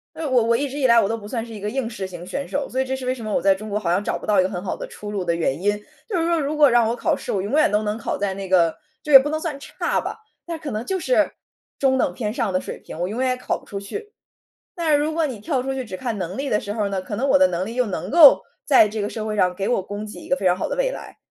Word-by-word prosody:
因 325 - -6
为 - - -1
我 250 -3 +4
我 230 +1 +3
一 285 +2 -1
直 280 +3 -6
以 265 - +3
来 235 -1 +6
我 200 - +1
都 225 - -1
不 205 -2 -10
算 230 -2 -3
是 230 - -11
一 205 - -8
个 210 - -3
应 260 -1 -2
试 200 -5 -5
型 175 -1 -9
选 280 +9 -4
手， 285 0 -2
所 260 - -2
以 - - +2
这 265 0 -2
是 260 -1 -7
为 255 - +1
什 235 -4 -9
么 215 - -3
我 - - +2
在 195 0 +5
中 215 +3 -8
国 210 +1 -1
好 185 -5 -2
像 180 +3 +2
找 - - -2
不 - - -10
到 205 -3 +4
一 - - +4
个 185 - 0
很 180 -1 -5
好 190 - -2
的 - - -6
出 205 0 -8
路 195 -3 -2
的 170 -1 +1
原 165 -2 -1
因。 205 - +3 0.4
就 385 -6 -1
是 330 - +1
说 335 -1 +2
如 295 +1 -2
果 295 -2 +6
让 235 -2 +4
我 235 - -1
考 - - +1
试， - - -6
我 190 - 0
永 205 - -4
远 305 0 +4
都 210 +1 +1
能 210 0 -2
考 - - -3
在 200 -2 -1
那 195 -1 -6
个 170 -3 +3 0.3
就 300 - -3
也 270 - +13
不 280 +3 -1
能 310 - -1
算 315 -3 -4
差 - - -2
吧， - - -6 0.3
但 335 -2 -4
可 305 -2 -6
能 215 0 -3
就 380 +4 -1
是 - - +2 0.5
中 265 -1 +2
等 - - +1
偏 215 -4 -3
上 230 -5 -1
的 185 - +1
水 - - -7
平， - - -10
我 175 - 0
永 220 +5 -4
远 260 -1 +2
也 255 - 0
考 - - -2
不 - - -20
出 200 - -5
去。 420 - -7 0.6
但 335 -4 0
是 290 - +6
如 300 +2 0
果 325 0 +1
你 250 -6 -6
跳 260 +3 -1
出 270 +1 -3
去 260 -2 -4
只 185 - -6
看 230 0 -3
能 185 0 -4
力 275 0 -2
的 210 - +2
时 205 - -5
候 210 -2 -1
呢， 195 -1 -2
可 190 +3 -5
能 270 +5 0
我 280 - +6
的 280 0 +6
能 180 -3 -2
力 225 +3 -6
又 250 -1 +2
能 200 - -4
够 310 -3 +8 0.2
在 260 -7 +6
这 215 0 -3
个 205 - -2
社 215 -1 -5
会 215 -1 -2
上 180 -2 +2
给 195 +2 -2
我 240 -6 +2
供 205 +2 -6
给 210 - -9
一 - - -11
个 275 - +2
非 200 - -5
常 180 - +3
好 - - -2
的 - - -3
未 - - +1
来。 - - -9
230 Hz, 375 characters per minute, -22 LUFS, 200-275 Hz, 0.6 s, 也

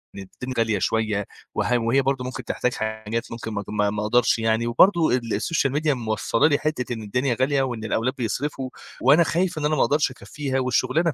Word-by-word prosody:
إن - - -7 0.2
الد 130 0 -4
غالية 110 -3 +1
شوية 105 +1 0 0.3
وها 125 - +1
وهي 120 +4 +2
برضه 135 -1 -1
ممكن 125 0 -5
تحتاج 125 +1 -1
حاجات 110 +1 -4
ممكن 115 -1 -6
ما 100 - -2
ت - - -27
ما 105 -1 +1
ما 105 +1 -3
أقدرش 115 +2 +2
يعني. 115 +1 +1
وبرضه 170 +7 +4
ال 115 -3 -3
السوشيال 135 +4 0
ميديا 150 0 +1
موصّلة 115 +1 +1
لي 145 -2 +3
حتّة 135 -5 -2
إن 110 - -6
الدنيا 120 +4 -1
غالية 140 +1 +2
وإن 120 -4 -3
الأولاد 115 +3 0
بيصرفوا 130 +2 -3 0.3
وأنا 145 +7 +6
خايف 175 +1 0
إن 150 - -1
أنا 155 - +2
ما - - +1
أقدرش 145 -2 +2
أكفّيها 135 +1 -4
والشُغلانة 150 +6 +1
125 Hz, 205 wpm, -23 LUFS, 110-140 Hz, 0.3 s, وأنا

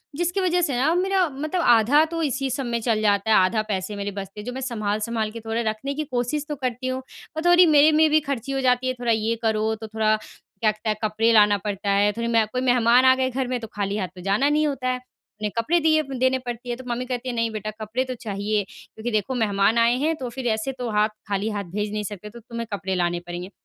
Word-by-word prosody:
जिसकी 350 +4 0
वजह 360 -1 +2
से 290 -6 0
ना 285 +6 +2
मेरा 375 0 +2
मतलब 305 +6 -3
आधा 240 +4 +5
तो 330 +1 -4
इसी 270 -2 -1
सब 265 +1 -2
में 235 -1 -1
चल 220 -2 +1
जाता 205 0 +2
है, - - +6
आधा 190 +4 +3
पैसे 195 0 -3
मेरे 200 0 -4
बचते 195 +1 -7
हैं, 210 - -8
जो 250 - -4
मैं 265 - -5
संभाल-संभाल 215 -2 -2
के 230 - -7
थोड़ा 225 +1 -2
रखने 220 +6 -4
की 305 +2 -2
कोशिश 250 +4 -1
तो 295 - -2
करती 255 -1 -3
हूँ 255 0 -2 0.4
और 315 - -3
थोड़ी 350 +1 +7
मेरे 305 -1 +6
में 310 +1 +4
भी 310 +1 +4
खर्ची 275 -3 -4
हो 270 0 -1
जाती 255 0 +2
है। 255 - +1
थोड़ा 240 -1 0
ये 220 +1 +1
करो, 220 -1 +1
तो 220 0 -8
थोड़ा 215 0 +1
क्या-कहते 215 0 -4
हैं, 215 - +1
कपड़े 220 +2 +2
लाना 210 -2 +6
पड़ता 200 0 -4
है, 200 +1 +3
थोड़ी 235 0 -1
मैं 230 -1 +3
कोई 250 +4 -3
मेहमान 245 0 +4
आ 260 0 +7
गए 260 0 0
घर 260 0 -2
में, 250 0 -2
तो 225 - -7
खाली 200 0 -1
हाथ 190 -3 -2
तो 180 - -10
जाना 200 +10 +2
नहीं 305 +1 +2
होता 270 -3 -3
है, 255 - +1 0.4
उन्हें 210 -1 -1
कपड़े 315 +10 +2
दिए 310 -1 +3
व 275 -3 -8
देने 260 +1 +2
पड़ती 245 -1 -7
है, 240 - -1
तो 260 - -10
मम्मी 240 +1 -2
कहती 255 0 -4
है, 245 - -3
"नहीं 230 -1 0
बेटा, 215 0 -4
कपड़े 225 +4 -1
तो 255 - -4
चाहिए 205 0 -1
क्योंकि 220 +3 -8
देखो, 215 +4 -1
मेहमान 210 -1 +2
आए 235 +1 +4
हैं, 310 +5 0
तो 260 -5 -5
फिर 245 +1 -5
ऐसे 220 +3 0
तो 250 -2 -5
हाथ 210 0 +2 0.2
खाली 205 +1 -1
हाथ 205 -2 -3
भेज 210 0 -2
नहीं 210 0 -2
सकते, 205 0 -7
तो 235 +3 -12
तुम्हें 235 0 -6
कपड़े 190 -1 -2
लाने 175 -1 0
पड़ेंगे।" 175 +1 -6
235 Hz, 260 wpm, -23 LUFS, 215-260 Hz, 0.4 s, थोड़ी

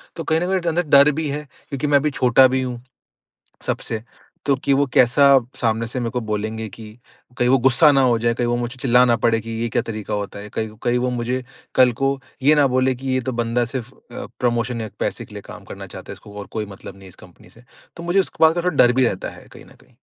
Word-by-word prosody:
तो 165 - -5
कहीं 160 0 +1
न 180 - -1
कहीं 190 - 0
एक 175 -2 -4
अंदर 170 +2 +1
डर 145 +2 +6
भी 155 - -2
है 150 +2 -4 0.3
क्योंकि 145 +1 -3
मैं 145 -1 +5
अभी 150 +2 0
छोटा 130 0 +5
भी 130 +1 -1
हूँ 125 -2 -5 0.9
सबसे, 110 -1 -3 0.4
तो 140 - +3
कि 135 +1 -1
वो 140 +1 +3
कैसा 130 +3 +5 0.3
सामने 115 -1 0
से 125 +2 -4
मेरे 115 -1 -2
को 125 -1 -2
बोलेंगें, 110 0 -4
कि 110 +1 -12 0.4
कहीं 125 0 +2
वो 135 +1 +4
गुस्सा 140 +4 +6
ना 135 - +3
हो 120 -3 +3
जाएँ, 115 +1 +1
कहीं 120 0 -1
वो 120 0 0
मुझे 120 +1 -4
चिल्ला 125 -1 +4
ना 120 -1 +3
पड़ें 115 -1 +1
कि 115 - -8
ये 120 - -1
क्या 115 - 0
तरीका 110 -3 -5
होता 100 0 -4
है। 105 +1 -8
कहीं 110 0 -2
कहीं 120 0 +1
वो 125 0 -1
मुझे 125 +1 -2 0.3
कल 125 -1 +5
को 135 0 +1 0.2
ये 150 +3 +6
ना 145 -2 +4
बोलें 130 0 +1
कि, 135 +1 -7
"ये 130 - +1
तो 130 +1 -4
बंदा 120 +1 0
सिर्फ़ 120 0 -6
अ, - - -10
प्रमोशन 120 -1 0
या 110 - -5
पैसे - - -2
के - - -15
लिए - - -8
काम - - -11
करना - - -9
चाहता - - -11
है, - - -7
इसको 105 - -15
और 100 - -8
कोई 110 -1 -3
मतलब 100 -1 -11
नहीं 95 - -17
है - - -11
इस - - -15
कंपनी - - -18
से।" 115 - -19 0.3
तो 170 - -8
मुझे 175 +3 +2
इस - - -1
को - - +1
बात 160 +1 +5
का 175 - -1
थोड़ा 180 -5 -1
डर 120 - +4
भी 130 0 +2
रहता 95 - -3
है - - -16
कहीं - - -13
न - - -18
कहीं। - - -25
125 Hz, 270 wpm, -21 LUFS, 115-135 Hz, 0.9 s, डर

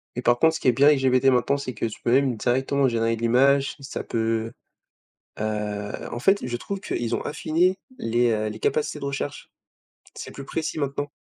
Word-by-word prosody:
Et 125 - -3
par 120 -1 +3
contre, 160 +4 +3
ce - - -3
qui - - -2
est - - +7
bien 135 +4 +4
avec 150 -2 +5
GPT 130 0 +2
maintenant, 125 +3 +2
c'est 130 -3 -5
que 115 - -3
tu 110 - -5
peux 120 - 0
même 130 -2 +3
directement 130 +3 +1
générer 115 -1 +1
de 115 - -10
l'image, 135 +4 +3
ça 135 - -6
peut, 115 0 -1 0.9
heu, 105 -1 -3
en 120 - -3
fait, 195 +9 +3
je 120 -1 -2
trouve 195 +9 -5
qu'ils 120 - -2
ont - - -2
affiné 170 +5 +1 0.2
les, 120 +1 +1
heu, 110 0 -1
les 105 +1 -7
capacités 150 +5 -1
de - - -7
recherche. 140 +1 -4 0.6
C'est - - -8
plus 140 - -9
précis 160 +2 -3
maintenant. 145 0 -2
125 Hz, 210 wpm, -24 LUFS, 115-140 Hz, 0.9 s, est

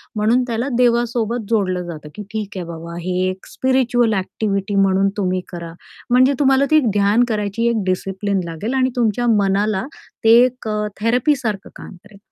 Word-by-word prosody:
म्हणून 225 +4 +2
त्याला 235 +2 -2
देवासोबत 235 -1 +1
जोडलं 185 -5 0
जातं, 155 -3 -8
की 210 - -6
ठीक 210 -3 -5
आहे 180 - -4
बाबा 170 0 -8
हे 180 +2 -3 0.2
एक 185 0 -7
स्पिरिच्युअल 245 -3 +1
ॲक्टिव्हिटी 200 +1 -2
म्हणून 195 0 +3
तुम्ही 185 -2 0
करा. 170 -2 -7 0.4
म्हणजे 255 +3 +4
तुम्हाला 270 -1 +4
ती 310 - +6
ध्यान 205 +3 +3
करायची 215 +1 -1
एक 225 -3 0
डिसिप्लिन 195 +2 -1
लागेल 170 +9 -4
आणि 260 -1 +2
तुमच्या 240 0 +1
मनाला 200 +1 +1 0.4
ते 225 - +4
एक 250 -2 -2
अ, 210 0 -1
थेरपीसारखं 230 -3 0
काम - - -10
करेल. 205 -1 -17
210 Hz, 160 wpm, -19 LUFS, 195-240 Hz, 0.4 s, ती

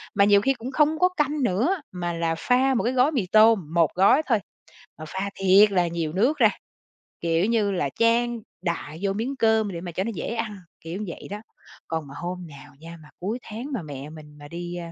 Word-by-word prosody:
mà 200 - +5
nhiều 205 0 +5
khi 270 +3 +2
cũng 245 +2 -7
không 305 +3 +2
có 365 0 +4
canh 300 -5 -1
nữa, 245 - +1
mà 175 -1 -3
là 165 -1 -1
pha 255 +6 +2
một 235 - 0
cái 245 +3 0
gói 260 +4 +3
mì 250 -10 0
tôm, 215 -7 +5
một 165 -3 +3
gói 200 +11 +5
thôi, 225 -5 +3 0.6
mà 155 - -8
pha 190 +4 -3
thiệt 195 +2 +5
là 180 -2 +2
nhiều 165 -2 -3
nước 250 +11 +2
ra, 225 -5 +6 0.7
kiểu 165 +2 +1
như 215 -3 +1
là, 160 -7 -1
chan 235 +1 +2 0.2
đại 165 -3 -4
vô 195 -1 +1
miếng 240 +7 -3
cơm 220 -4 +2
để 170 -1 -6
mà 175 -1 -6
cho 185 +3 -2
nó 230 - -3
dễ 200 - -4
ăn, 220 -3 -3 0.2
kiểu 175 +6 -5
vậy 170 - -8
đó. 205 +1 -6 0.5
Còn 160 -3 -3
mà 140 - -11
hôm 180 0 -5
nào 145 -1 -13
nha 165 +1 -10
mà 150 - -16
cuối 210 +7 -3
tháng 235 +7 -7
mà 225 - -2
mẹ 145 -1 -8
mình 150 -1 -13
mà 145 - -11
đi, 175 +2 -6
a, 170 -1 -6
195 Hz, 230 wpm, -24 LUFS, 170-235 Hz, 0.7 s, ra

